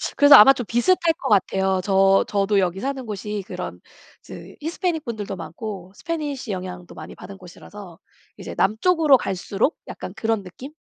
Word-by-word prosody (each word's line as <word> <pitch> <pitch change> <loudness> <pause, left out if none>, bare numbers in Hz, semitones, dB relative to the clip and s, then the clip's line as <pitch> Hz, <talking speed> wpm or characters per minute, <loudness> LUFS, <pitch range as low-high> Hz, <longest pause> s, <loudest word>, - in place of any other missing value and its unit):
그래서 285 0 +8
아마 270 +6 +9
좀 245 -4 -5
비슷할 240 - +2 0.2
것 270 - -4
같아요. 190 -2 +1
저 195 0 +3
저도 200 0 +1
여기 185 0 -1
사는 265 +1 -4
곳이 210 -1 -5
그런 - - -7 0.4
즈 - - -12
히스패닉 330 0 -2
분들도 210 -4 -5
많고 185 +3 -8
스패니쉬 295 -8 -5
영향도 180 -2 -7
많이 - - -10
받은 195 +2 -11
곳이라서 185 0 -13 0.4
이제 - - -8
남쪽으로 300 - +3
갈수록 195 - -2
약간 - - -8
그런 225 -2 -1
느낌? 255 - -11
210 Hz, 355 characters per minute, -22 LUFS, 190-270 Hz, 0.4 s, 아마